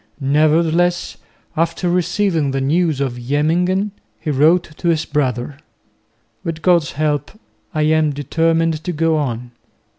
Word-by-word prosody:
Nevertheless 160 +5 +2 0.4
after 165 +2 0
receiving 175 -3 +1
the 135 0 -1
news 155 +2 +1
of 130 -3 -2
Jemmingen 170 +10 0 0.3
he 150 - -2
wrote 155 +3 +2
to - - -3
his 160 -2 +2
brother, 135 -2 -2 0.9
"With 165 -3 -5
God's 170 -5 +3
help 150 -1 -1 0.4
I 155 -3 0
am 155 0 +3
determined 165 +3 0
to 180 - -3
go 165 0 +1
on." 125 -4 -3
155 Hz, 125 wpm, -18 LUFS, 145-170 Hz, 0.9 s, God's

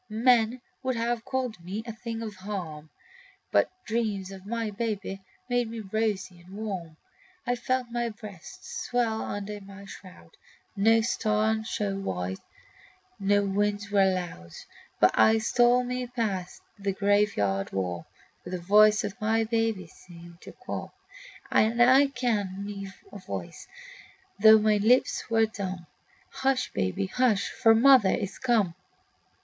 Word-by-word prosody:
Men 235 +1 +3 0.2
would 260 -1 -1
have 230 0 -1
called 250 -9 -3
me 195 +5 -5
a 230 - -6
thing 230 0 -6
of 215 -2 -5
harm, 175 -6 -6 0.6
But - - +3 0.2
dreams 210 -4 -2
of 190 0 -11
my 230 -1 -2
babe 210 -1 -3 0.4
made 245 -2 0
me 230 0 -6
rosy 200 -3 -2
and 185 +3 -13
warm. 185 -7 -5 0.5
I 245 - +1
felt 250 0 -2
my 240 0 -1
breasts 210 -4 -9
swell 230 -3 0
under 205 0 -5
my 195 0 -12
shroud; 185 - -13 0.4
No 225 +3 +4
star 220 -1 0
shone 200 -3 -3
white, 90 - -3 0.8
no 205 +1 +2
winds 205 +1 -1
were 195 -2 +4
loud; 170 - -5 0.5
But - - +6
I 220 0 +5
stole 240 +3 +3
me 250 0 -3
past 215 -7 -3 0.2
the 200 -1 -1
graveyard 200 - +1
wall, 90 -3 -3 0.4
For - - -8
the 185 - -3
voice 210 +4 +5
of 205 - -3
my 225 +1 +2
baby 225 -4 -1
seemed 170 +1 -15
to - - -10
call; - - -7 0.6
And 225 +2 +3
I 260 +4 +6
kenned 205 -8 -2
me 200 -1 -6 0.2
a - - -9
voice, - - -7 0.7
though 220 +1 +9
my 215 0 +3
lips 230 +5 +2
were 225 -1 +4
dumb: 190 -5 -6 0.5
Hush, 265 -1 0
baby, 95 - -1
hush! 220 0 +1
for 225 0 +4
mother 250 -3 +6
is 200 0 -2
come. 225 -9 +2
210 Hz, 145 wpm, -27 LUFS, 195-230 Hz, 0.8 s, though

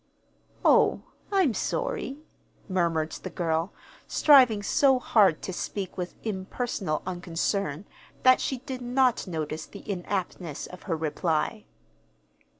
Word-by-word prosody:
"Oh, - - +4 0.3
I'm 375 - +3
sorry," 485 - -2 0.5
murmured 170 -4 0
the - - -6
girl, 165 +1 -1 0.4
striving 250 -8 +5
so 270 +4 +4
hard 205 -9 +3
to 185 - -4
speak 190 +1 -4
with 180 -1 -5
impersonal 190 -4 -3
unconcern 175 -1 -2 0.4
that 255 0 +6
she 265 - -1
did 255 0 -7
not 250 -2 +2
notice 155 -2 -4
the 200 - -12
inaptness 180 -4 -3
of 180 - -11
her 165 - +1
reply. 160 +6 -1
190 Hz, 115 wpm, -27 LUFS, 165-250 Hz, 0.5 s, that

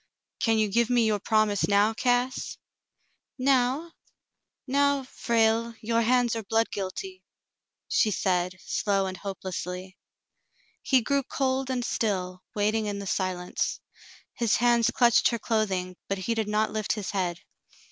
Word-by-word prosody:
"Can 225 -3 +2
you 215 -1 +2
give 230 +3 +1
me 240 -2 +3
your 215 -1 +1
promise 215 -1 +2
now, 205 +2 +3
Cass 245 +2 0 0.4
?'* - - -47
"Now? 265 +4 +1 0.7
Now, 280 +1 +2
Frale, 230 -2 +1
your 230 +1 +1
hands 240 0 +2
are 225 - -2
blood 225 +2 0
guilty," 370 - -5 0.6
she 220 - +2
said, 180 -2 0
slowly 195 -2 0
and 185 - -7
hopelessly. 185 -1 -6 0.8
He 265 -2 +3
grew 280 +4 +1
cold 265 0 -1
and 250 -2 -1
still, 185 -6 -2
waiting 215 +1 +1
in 205 -1 -3
the 200 - -6
silence. 185 -2 -2 0.5
His 235 -3 +1
hands 240 -1 +3
clutched 240 -2 +4
her 235 - 0
clothing, 195 -5 -1
but 195 - -1
he 190 +5 -1
did 220 -2 -1
not 210 +1 +1
lift 215 -2 -1
his 210 -3 -4
head. 180 -3 -1
220 Hz, 145 wpm, -27 LUFS, 195-245 Hz, 0.8 s, clutched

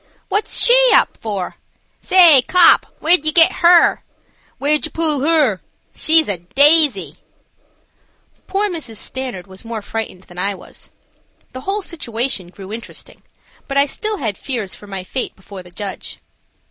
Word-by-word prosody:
"What's 415 - -1
she 485 - +6 0.2
up - - +2
for?" 200 -5 -6 0.4
"Say, 340 -8 +6
kop, 360 -2 +5
where 340 +3 +4
did 310 - -17
ye 310 - +2
get 325 0 +5
her?" 345 -1 +4 0.6
"Where 285 +2 -1
did 300 - -3
yer - - -17
pull 310 -4 -1
'er?" 295 - +1 0.3
"She's 320 -1 +3
a 195 -4 -3
daisy!" 270 - +3 1.3
Poor 395 +2 -1
Mrs. 315 - -7
Stanard 255 -6 -6
was 190 -1 -13
more 225 -2 -7
frightened 220 -4 -6
than 175 -1 -12
I 200 +2 -2
was. 185 - -10 0.6
The 255 - -8
whole 395 +6 -3
situation 240 - -4
grew 190 +3 -11
interesting, 230 +1 -10 0.5
but 275 - -3
I 280 - +5
still 425 +9 -4
had 220 - -4
fears 235 -8 -4
for 205 - -11
my 195 -2 -7
fate 255 +7 -5
before 190 0 -12
the 180 - -16
judge. 195 +2 -8
260 Hz, 160 wpm, -17 LUFS, 200-325 Hz, 1.3 s, she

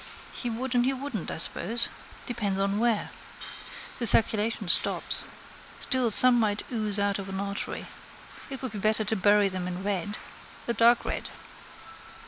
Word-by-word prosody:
He 245 - -4
would 240 +3 -4
and 245 -1 +2
he 265 +2 0
wouldn't, 260 - -6
I - - -6
suppose. 230 +8 0 0.4
Depends 210 -6 -3
on 200 +1 -1
where. 230 -2 -1 0.9
The 235 - 0
circulation 220 0 +1
stops. 170 - +3 0.5
Still 255 -3 +2
some 245 +3 +9
might 210 -2 -1
ooze 215 -4 -2
out 200 0 -1
of 195 0 -8
an 190 0 -5
artery. 200 0 -5 0.6
It 270 -1 -8
would 260 - -5
be 210 - -7
better 215 +2 0
to 215 +1 -1
bury 205 +1 +3
them 185 -2 -4
in 180 +1 -6
red: 205 +1 -3 0.5
a 235 - -1
dark 235 +1 +3
red. - - -5
215 Hz, 160 wpm, -26 LUFS, 200-240 Hz, 0.9 s, some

